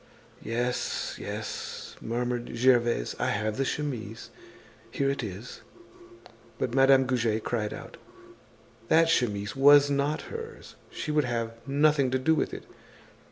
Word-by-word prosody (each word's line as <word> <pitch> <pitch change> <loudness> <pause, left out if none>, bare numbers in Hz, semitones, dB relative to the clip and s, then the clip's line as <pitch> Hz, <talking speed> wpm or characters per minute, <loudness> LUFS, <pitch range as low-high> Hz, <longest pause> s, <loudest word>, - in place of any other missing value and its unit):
"Yes, 120 +2 -2
yes," - - -6
murmured 120 +1 -3
Gervaise, 120 - +2
"I - - 0
have 110 +1 -1
the 135 - +1
chemise. 120 -7 -4 0.6
Here 140 0 0
it 140 - -3
is." 105 +1 -7 1.0
But 120 - -2
Madame 135 0 +5
Goujet 115 -4 0
cried 105 -3 -2
out. - - -9 0.9
That 165 +4 +4
chemise 105 -4 0
was 145 +1 +7
not 140 +2 0
hers, 455 0 -8
she 155 - -4
would 150 -2 +2
have 115 -1 -2
nothing 145 -1 +3
to 130 - +1
do 130 +5 +2
with - - 0
it. - - -7
125 Hz, 130 wpm, -28 LUFS, 115-140 Hz, 1.0 s, was